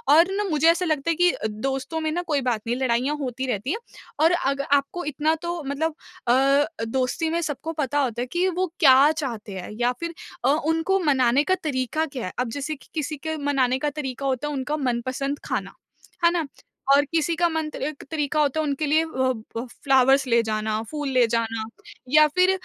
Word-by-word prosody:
और 340 +4 +5
ना 415 - +1
मुझे 310 +1 +2
ऐसा 350 +2 -1
लगता 310 0 0
है 330 - +2
कि 355 +2 +4 0.2
दोस्तों 270 +8 -3
में 315 -1 -1
ना 350 +2 -1
कोई 290 -4 +1
बात 220 -3 -1
नहीं 240 - +1
लड़ाइयाँ 260 +2 +1
होती 260 0 -3
रहती 220 +7 -2
है 435 - -1 0.4
और 325 +2 +5
अग 275 -5 0
आपको 285 +5 0
इतना 305 +2 +1
तो 345 -1 -3
मतलब 305 +3 -1 0.3
अ, 275 +4 +4 0.2
दोस्ती 260 +6 -1
में 340 +1 0
सबको 315 +1 -3
पता 290 -2 -1
होता 240 -3 -1
है 250 - -2
कि 355 +2 +1
वो 365 -1 -1
क्या 275 +1 +7
चाहते 235 -10 -5
हैं 180 - -7
या 245 +1 +3
फिर 335 0 -4 0.3
अ, - - +4 0.2
उनको 325 +5 +1
मनाने 265 -1 +3
का 375 +2 +2
तरीक़ा 270 0 -2
क्या 255 -4 -4
है? 185 - -4
अब 250 -2 0
जैसे 285 +4 -3
कि 280 - -20
किसी 305 -1 -3
के 315 +2 -4
मनाने 275 -3 +1
का 295 - 0
तरीक़ा 275 -2 -5
होता 265 +2 -1
है 295 - -3
उनका 275 +3 -2
मनपसंद 260 +1 -2
खाना। - - -3 0.5
है 340 - +6
ना? 330 -4 -1 0.4
और 285 +1 +6
किसी 330 0 +1
के 345 +1 +3
मन 320 -1 -2
त - - -6 0.2
क - - -12
तरीक़ा 300 -1 0
होता 290 +2 +1
है 310 - +1
उनके 290 +1 -1
लिए 310 +3 +3
अ - - -5 0.5
अ, - - -1 0.2
फ्लावर्स 270 0 +4
ले 235 -1 +4
जाना 215 0 -1
फूल 295 -2 -3
ले 255 -2 +4
जाना 225 -1 -1 0.5
या 305 +2 +7
फिर 365 +5 +3
285 Hz, 210 wpm, -24 LUFS, 255-320 Hz, 0.5 s, क्या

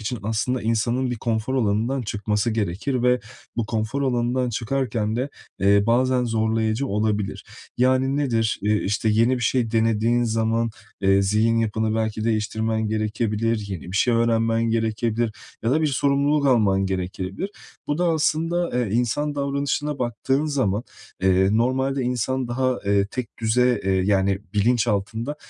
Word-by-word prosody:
için 115 +2 -3
aslında 110 +4 -1
insanın 115 +3 0
bir 120 - -2
konfor 115 +3 -2
alanından 115 +3 0
çıkması 105 +1 -1
gerekir 110 +5 -1
ve 125 0 +3 0.4
bu 115 - -1
konfor 110 +5 -2
alanından 125 -1 0
çıkarken 115 -2 -1
de, 130 +4 -2 0.3
eee, 100 +1 +4
bazen 125 +2 +2
zorlayıcı 110 +2 0
olabilir. 105 -2 -1 0.3
Yani, 130 +2 +2
nedir? 115 -6 0
Eee, 105 +1 +2
işte, 105 +2 0
yeni 115 +4 +3
bir 120 - -4
şey 115 -1 +1
denediğin 115 +1 +2
zaman, 115 0 0 0.3
eee, 95 0 +4
zihin 110 +4 +2
yapını 110 0 0
belki 110 -1 -1
değiştirmen 110 0 -1
gerekebilir, 110 +1 -1
yeni 95 -4 -5
bir - - -2
şey 120 +2 +3
öğrenmen 115 0 +2
gerekebilir 115 0 0 0.3
ya 115 - +2
da 155 - +2
bir - - +3
sorumluluk 140 +1 +2
alman 100 -6 +3
gerekebilir. 95 - -4 0.4
Bu 145 +2 -1
da 180 - +2
aslında, 165 +2 +1
eee, 120 -3 0
insan 125 +6 0
davranışına 140 +1 -1
baktığın 130 +4 0
zaman, 120 -7 0 0.4
eee, 95 0 +4
normalde 130 +4 +1
insan 125 +1 -1
daha, 130 +1 0
eee, 100 0 +3
tekdüze, 120 0 0
eee, 95 - +1
yani, 95 +1 +2 0.2
bilinçaltında, 115 +3 0
115 Hz, 145 wpm, -23 LUFS, 110-130 Hz, 0.4 s, eee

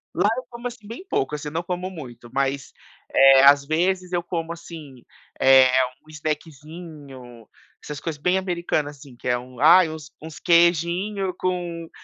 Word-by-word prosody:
lá 190 +4 +2
eu 255 - -4
como 240 0 -6
assim 235 -4 -11
bem 235 - -9
pouco, 135 +3 -1
assim, 150 0 -6
não 160 +3 -3
como 180 +1 -4
muito, 125 -8 -11
mas, 135 0 -2 0.4
eh, 135 0 +7
às 140 0 +6
vezes 180 +4 -1
eu 175 -1 0
como 170 -1 -4
assim, 150 -7 -12 0.4
eh, 130 -1 +7 0.4
um - - -20
snackzinho, 150 -5 -8 0.4
essas 150 -1 -7
coisas 155 -3 -6
bem 180 +4 +2
americanas, 170 -5 -2
assim, 135 -2 -15
que 125 - -8
é 125 0 +2
um 125 0 -12
ai, 165 +4 +6
uns 155 -1 -9
uns 160 -1 -10
queijinho 175 +3 +2
com 175 -2 -3
160 Hz, 165 wpm, -23 LUFS, 140-180 Hz, 0.4 s, eh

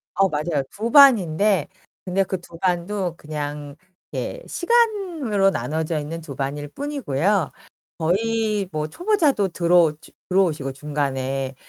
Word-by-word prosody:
어 195 -1 +3
맞아요. 150 -1 -1
2 225 +3 -4
반인데 205 - +5 0.4
근데 190 +2 +1
그 185 0 -4
2 170 -1 -13
반도 180 0 -1
그냥 145 -1 -6 0.4
예, - - -4
시간으로 355 - +1
나눠져 160 -2 -2
있는 165 +3 -5
2 145 -4 -8
반일 145 +2 -3
뿐이고요. 200 - -1 0.5
거의 210 +3 0
뭐 155 0 -2
초보자도 305 - +1
들어오 170 -2 +3
저 - - -17 0.2
들어오시고 160 -8 +1
중간에. 135 -2 -2
175 Hz, 250 characters per minute, -22 LUFS, 150-215 Hz, 0.5 s, 반인데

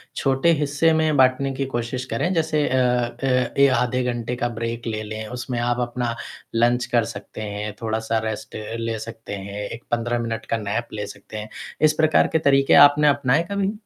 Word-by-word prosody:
छोटे 135 +4 +2
हिस्से 145 +2 +2
में 155 -1 +2
बाँटने 130 +1 +3
की 135 +1 -2
कोशिश 120 +2 -2
करें। 170 +10 0
जैसे 160 -3 +1
अ 130 - 0 0.5
अ 125 -2 +1
ए 140 - +8
आधे 125 +1 0
घंटे 120 +1 -3
का 120 0 -1
ब्रेक 115 0 -4
ले 110 -1 -2
लें, 110 +1 -6
उसमें 125 +1 -4
आप 120 +1 0
अपना 120 -1 -3 0.4
लंच 120 +1 +3
कर 120 -2 +3
सकते - - -9
हैं, 105 0 -4
थोड़ा-सा 110 0 -1
रेस्ट 110 -1 -6 0.2
ले 115 -1 -2
सकते 115 -1 -8
हैं, 100 +1 -6
एक 115 - -8
15 120 0 0
मिनट 115 -1 -3
का 115 - +1
नैप 110 +2 -3
ले 105 -1 -4
सकते 100 +2 -10
हैं। 105 0 -6 0.3
इस 155 0 +5
प्रकार 155 0 +3
के 160 - +4
तरीके 135 0 +4
आपने 150 +1 +1
अपनाए 140 +1 +3
कभी? 200 0 0
120 Hz, 190 wpm, -23 LUFS, 115-135 Hz, 0.5 s, ए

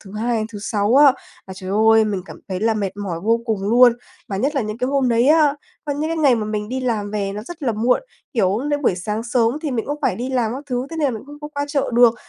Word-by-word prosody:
thứ 195 -1 -13
Hai 230 +3 -1
đến 215 - -2
thứ 210 - -6
Sáu 210 +2 0
á 285 -2 +8 0.3
là, 190 - -8
trời 185 0 -7
ơi, 220 +2 +5
mình 200 -3 -2
cảm - - -12
thấy 185 -1 -3
là 225 +1 +2
mệt 200 -2 -3
mỏi 190 -5 -4
vô 225 +5 +1
cùng 220 -4 -1
luôn. 240 +4 +6 0.4
Và 195 - -3
nhất 275 +9 0
là 275 - +1
những 215 +1 -5
cái 250 - 0
hôm 275 -2 +1
đấy 235 +2 +3
á, 305 -2 +5 0.3
có 295 - -2
những 300 +3 -2
cái 330 - -1
ngày 290 -5 +4
mà 225 -2 -2
mình 210 0 -3
đi 260 +1 -3
làm 220 -5 -1
về 200 -2 -2
nó 210 +1 -6
rất 325 +6 -10
là 240 - +1
muộn, 235 - +1 0.3
kiểu, 200 -3 +1
đến 290 0 -1
buổi 220 - +2
sáng 210 +4 -3
sớm 240 +2 +1
thì 300 - -2
mình 235 -4 -2
cũng 290 +1 -3
phải - - +1
đi 250 +3 -4
làm 240 -4 0
các 275 - -6
thứ, 250 -1 -2
thế 325 - -6
nên 315 - 0
là 280 - +3
mình 220 -3 -7
không 290 +1 -11
có 295 - -6
qua 285 0 -1
chợ 285 -2 -1
được, 240 -1 +6
230 Hz, 300 wpm, -20 LUFS, 210-275 Hz, 0.4 s, á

